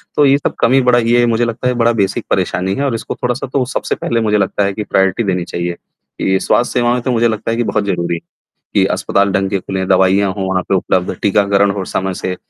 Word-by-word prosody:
तो 145 Hz, -, +4 dB
ये 140 Hz, 0 st, +5 dB
सब -, -, -3 dB
कमी 130 Hz, +3 st, +4 dB
बड़ा 125 Hz, -1 st, +4 dB
ये 120 Hz, +1 st, +3 dB
मुझे 115 Hz, 0 st, +1 dB
लगता 115 Hz, +2 st, -3 dB
है 125 Hz, -, +2 dB
बड़ा 120 Hz, +1 st, +4 dB
बेसिक 95 Hz, -, -1 dB
परेशानी 95 Hz, +2 st, 0 dB
है 140 Hz, -, -2 dB
और 125 Hz, -4 st, 0 dB
इसको -, -, -5 dB
थोड़ा-सा 125 Hz, +2 st, -3 dB
तो 130 Hz, -2 st, +1 dB
सबसे -, -, -1 dB
पहले 115 Hz, -1 st, -1 dB
मुझे 105 Hz, -1 st, +2 dB
लगता 100 Hz, 0 st, 0 dB
है 100 Hz, -, -1 dB
कि 105 Hz, -, -4 dB
प्रायोरिटी 95 Hz, +4 st, +1 dB
देनी 90 Hz, -3 st, -1 dB
चाहिए। 85 Hz, 0 st, -3 dB, 0.5 s
ये 95 Hz, 0 st, +2 dB
स्वास्थ्य 120 Hz, +4 st, +1 dB
सेवाएँ 120 Hz, 0 st, +1 dB
तो 130 Hz, -, -1 dB
मुझे 120 Hz, -1 st, +2 dB
लगता 110 Hz, 0 st, -2 dB
है 115 Hz, -, -1 dB
कि 120 Hz, -, +1 dB
बहुत 105 Hz, -2 st, -1 dB
ज़रूरी 85 Hz, -3 st, -1 dB
है -, -, -5 dB, 0.5 s
कि -, -, +3 dB
अस्पताल 100 Hz, 0 st, 0 dB
ढंग 95 Hz, 0 st, 0 dB
के 100 Hz, -, -1 dB
खुलें, 95 Hz, 0 st, -4 dB
दवाइयां 95 Hz, +1 st, +3 dB
हों 95 Hz, -2 st, -3 dB
वहाँ 95 Hz, -1 st, 0 dB
पे 95 Hz, -, +3 dB
उपलब्ध, 90 Hz, 0 st, 0 dB
टीकाकरण 100 Hz, 0 st, +2 dB
हो 95 Hz, -1 st, -3 dB
समय 95 Hz, +1 st, -2 dB
से 90 Hz, +1 st, -4 dB
100 Hz, 245 wpm, -16 LUFS, 95-120 Hz, 0.5 s, ये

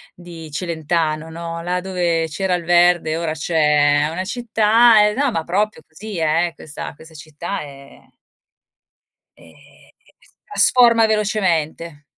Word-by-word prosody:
di 170 Hz, -2 st, -11 dB
Celentano, 160 Hz, -1 st, -2 dB
no: 165 Hz, 0 st, -7 dB
"Là 180 Hz, +1 st, -2 dB
dove 175 Hz, -3 st, -1 dB
c'era 180 Hz, +4 st, -2 dB
il 175 Hz, -, -5 dB
verde 175 Hz, -2 st, +2 dB
ora 165 Hz, -2 st, -2 dB
c'è 150 Hz, -2 st, +2 dB
una 180 Hz, +3 st, -4 dB
città", 225 Hz, 0 st, +3 dB
e 210 Hz, -, -1 dB
no, 275 Hz, +4 st, 0 dB
ma 165 Hz, -6 st, -2 dB
proprio 195 Hz, 0 st, -2 dB
così 200 Hz, +5 st, -9 dB
eh, 165 Hz, +2 st, 0 dB
questa 150 Hz, -2 st, -8 dB
questa 160 Hz, +2 st, -16 dB
città 155 Hz, +5 st, -7 dB
è 140 Hz, -1 st, -13 dB, 1.4 s
ehm, -, -, -18 dB, 0.7 s
si -, -, -25 dB
trasforma 240 Hz, -, +4 dB
velocemente. 170 Hz, -8 st, -1 dB
170 Hz, 130 wpm, -19 LUFS, 160-200 Hz, 1.4 s, trasforma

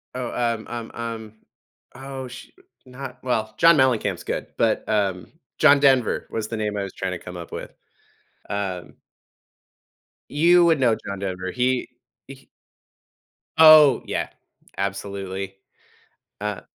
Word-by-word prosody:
Oh, 125 Hz, -2 st, -4 dB
um 115 Hz, -2 st, -1 dB
um 115 Hz, -1 st, -6 dB
um 115 Hz, -2 st, -6 dB, 0.6 s
oh, 135 Hz, 0 st, -7 dB
shoot, 125 Hz, 0 st, -12 dB, 0.3 s
not 130 Hz, 0 st, -9 dB
well, 110 Hz, -4 st, -1 dB
John 165 Hz, -1 st, +6 dB
Mellencamp's 115 Hz, -, +1 dB
good, -, -, -4 dB
but, 115 Hz, -1 st, +1 dB
um, 100 Hz, -4 st, -1 dB, 0.3 s
John 145 Hz, 0 st, +6 dB
Denver 135 Hz, -4 st, +3 dB
was 110 Hz, -1 st, -3 dB
the 115 Hz, -, -3 dB
name 105 Hz, -1 st, -2 dB
I 100 Hz, -, -1 dB
was 100 Hz, -, -7 dB
trying 95 Hz, -1 st, -3 dB
to 90 Hz, -, -5 dB
come 90 Hz, +1 st, -9 dB
up 85 Hz, -, -9 dB
with. -, -, -7 dB, 0.8 s
Um 95 Hz, -3 st, -4 dB, 1.4 s
You 170 Hz, +4 st, +5 dB
would 165 Hz, -3 st, +3 dB
know 120 Hz, -4 st, +3 dB
John 100 Hz, -1 st, -5 dB
Denver. 95 Hz, -1 st, -4 dB
He 125 Hz, +2 st, 0 dB, 0.4 s
h 135 Hz, 0 st, -13 dB, 1.1 s
Oh, 155 Hz, -5 st, +8 dB
yeah. -, -, -2 dB, 0.5 s
Absolutely. 100 Hz, -1 st, -4 dB, 0.9 s
Uh 105 Hz, -2 st, -3 dB
115 Hz, 135 wpm, -23 LUFS, 100-130 Hz, 1.4 s, Oh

